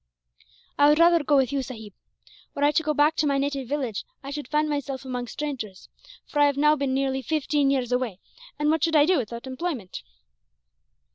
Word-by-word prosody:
"I 290 Hz, 0 st, +7 dB
would 300 Hz, -, +4 dB
rather 335 Hz, -1 st, +5 dB
go 290 Hz, 0 st, +3 dB
with 265 Hz, -1 st, +2 dB
you, 280 Hz, -1 st, 0 dB
sahib. 220 Hz, -6 st, -9 dB, 0.6 s
Were 285 Hz, -, -1 dB
I 290 Hz, -, +5 dB
to 300 Hz, -, +2 dB
go 305 Hz, -1 st, -1 dB
back 295 Hz, +2 st, +3 dB
to 305 Hz, -, +2 dB
my 280 Hz, -1 st, +1 dB
native 275 Hz, -2 st, -2 dB
village, 260 Hz, -6 st, -3 dB, 0.2 s
I 275 Hz, -, -6 dB
should 290 Hz, -2 st, -5 dB
find 300 Hz, +2 st, +1 dB
myself 280 Hz, -2 st, -3 dB
among 250 Hz, -1 st, -4 dB
strangers, 235 Hz, -10 st, -6 dB, 0.4 s
for 295 Hz, -, -3 dB
I 290 Hz, -, +6 dB
have 285 Hz, -1 st, -1 dB
now 300 Hz, +1 st, +4 dB
been 275 Hz, -2 st, -1 dB
nearly 265 Hz, 0 st, 0 dB
fifteen 295 Hz, 0 st, 0 dB
years 255 Hz, -3 st, 0 dB
away; 250 Hz, -6 st, -1 dB, 0.4 s
and 300 Hz, +1 st, +1 dB
what 320 Hz, -2 st, 0 dB
should 325 Hz, -1 st, +2 dB
I 295 Hz, -1 st, +6 dB
do 360 Hz, -1 st, +3 dB
without 235 Hz, 0 st, -6 dB
employment?" 260 Hz, -, -5 dB
280 Hz, 205 wpm, -25 LUFS, 260-300 Hz, 0.6 s, I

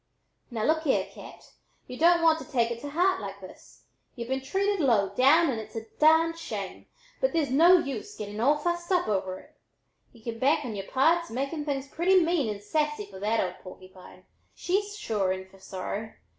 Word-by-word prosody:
"Now 225 Hz, -4 st, -3 dB
look 315 Hz, +4 st, +2 dB
here, 270 Hz, -, +2 dB
Cat, -, -, -13 dB, 0.3 s
y'u 250 Hz, -, -8 dB
don't 340 Hz, +3 st, +4 dB
want 320 Hz, -1 st, +4 dB
to -, -, -8 dB
take 235 Hz, -3 st, +1 dB
it 235 Hz, 0 st, -5 dB
to 290 Hz, -, -6 dB
heart 360 Hz, +3 st, +1 dB
like 200 Hz, -1 st, -7 dB
this! 185 Hz, -1 st, -14 dB, 0.3 s
Y'u've 235 Hz, -1 st, -6 dB
been 265 Hz, 0 st, -1 dB
treated 395 Hz, +8 st, 0 dB
low 225 Hz, -, +3 dB
down 275 Hz, -, +4 dB
and 230 Hz, -, -3 dB
it's 215 Hz, +1 st, -13 dB
a 225 Hz, 0 st, -5 dB
darned 325 Hz, +2 st, +4 dB
shame, -, -, -6 dB, 0.3 s
but -, -, +1 dB
there's 310 Hz, -5 st, 0 dB
no 340 Hz, +7 st, +7 dB
use 275 Hz, -9 st, -4 dB
getting 210 Hz, 0 st, -6 dB
all 280 Hz, +6 st, +3 dB
fussed 345 Hz, +3 st, -3 dB
up 360 Hz, -1 st, +2 dB
over 190 Hz, -2 st, -2 dB
it. -, -, -20 dB, 0.6 s
Y'u 230 Hz, -2 st, -19 dB
can 230 Hz, -1 st, -5 dB
bank 290 Hz, +3 st, +2 dB
on 225 Hz, -4 st, -5 dB
yere 195 Hz, -1 st, -6 dB
pards 335 Hz, +6 st, +2 dB
making 275 Hz, +5 st, -3 dB
things 280 Hz, -2 st, -3 dB
pretty 365 Hz, +6 st, +3 dB
mean 330 Hz, -8 st, +1 dB
and 205 Hz, -1 st, -8 dB
sassy 300 Hz, -1 st, -1 dB
for 195 Hz, -1 st, -12 dB
that 215 Hz, +3 st, 0 dB
'old 180 Hz, -1 st, -2 dB
porkypine.' 185 Hz, 0 st, -13 dB, 0.3 s
She's 405 Hz, +3 st, -1 dB
sure 205 Hz, -, -1 dB
in 190 Hz, 0 st, -4 dB
fer 195 Hz, 0 st, -19 dB
sorrow! 200 Hz, +3 st, -6 dB
270 Hz, 200 wpm, -27 LUFS, 210-330 Hz, 0.6 s, no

